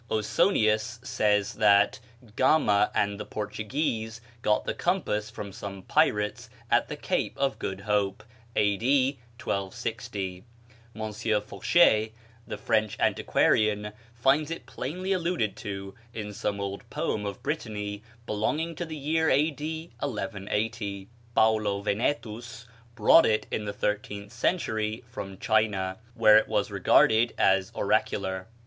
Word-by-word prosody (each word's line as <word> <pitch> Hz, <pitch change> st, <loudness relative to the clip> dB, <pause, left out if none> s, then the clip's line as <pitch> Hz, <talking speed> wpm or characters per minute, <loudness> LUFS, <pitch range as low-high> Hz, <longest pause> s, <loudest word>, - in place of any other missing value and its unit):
Osonius 110 Hz, -, +2 dB
says 105 Hz, -4 st, +1 dB
that 100 Hz, +1 st, +4 dB, 0.4 s
Gama 125 Hz, -7 st, +4 dB
and 100 Hz, 0 st, +1 dB
the -, -, -5 dB
Portuguese 110 Hz, +2 st, -3 dB, 0.2 s
got 105 Hz, -1 st, +1 dB
the -, -, -1 dB
compass 140 Hz, -, -1 dB
from 100 Hz, -2 st, -7 dB
some 100 Hz, -1 st, -7 dB
pirates 105 Hz, +2 st, +1 dB, 0.2 s
at -, -, +3 dB
the -, -, -5 dB
Cape -, -, -2 dB
of 135 Hz, -1 st, 0 dB
Good 95 Hz, 0 st, -4 dB
Hope, 105 Hz, -1 st, 0 dB, 0.3 s
A.D. 130 Hz, +7 st, +2 dB, 0.2 s
1260. 95 Hz, -1 st, -4 dB, 0.5 s
M. 110 Hz, 0 st, -1 dB
Fauchet, 110 Hz, -, +3 dB, 0.3 s
the -, -, -5 dB
French 110 Hz, -2 st, 0 dB
antiquarian, 105 Hz, -1 st, +2 dB, 0.2 s
finds 135 Hz, +6 st, +2 dB
it 165 Hz, -, -6 dB
plainly 185 Hz, +9 st, -3 dB
alluded 170 Hz, -, 0 dB
to 100 Hz, -3 st, -6 dB, 0.2 s
in 105 Hz, -2 st, -5 dB
some 100 Hz, 0 st, -2 dB
old 100 Hz, 0 st, -5 dB
poem 105 Hz, -, -2 dB
of 100 Hz, -, -7 dB
Brittany 105 Hz, -8 st, -3 dB, 0.2 s
belonging 150 Hz, +11 st, -1 dB
to 175 Hz, -, -4 dB
the 160 Hz, -1 st, -6 dB
year 160 Hz, +3 st, +1 dB
A.D. 155 Hz, +3 st, 0 dB
1180. 105 Hz, -4 st, -3 dB, 0.3 s
Paulo 110 Hz, -2 st, +3 dB
Venetus 115 Hz, +1 st, -2 dB, 0.3 s
brought 120 Hz, +9 st, +6 dB
it 110 Hz, -1 st, +1 dB
in 105 Hz, -, -2 dB
the 100 Hz, -, -2 dB
thirteenth 105 Hz, +1 st, -3 dB
century 110 Hz, -5 st, -1 dB
from 95 Hz, -5 st, -7 dB
China, 100 Hz, -3 st, +1 dB, 0.2 s
where 110 Hz, -2 st, +7 dB
it -, -, -3 dB
was -, -, 0 dB
regarded 115 Hz, +2 st, +4 dB
as 95 Hz, -1 st, +3 dB
oracular. 95 Hz, -1 st, 0 dB
110 Hz, 125 wpm, -27 LUFS, 100-125 Hz, 0.5 s, where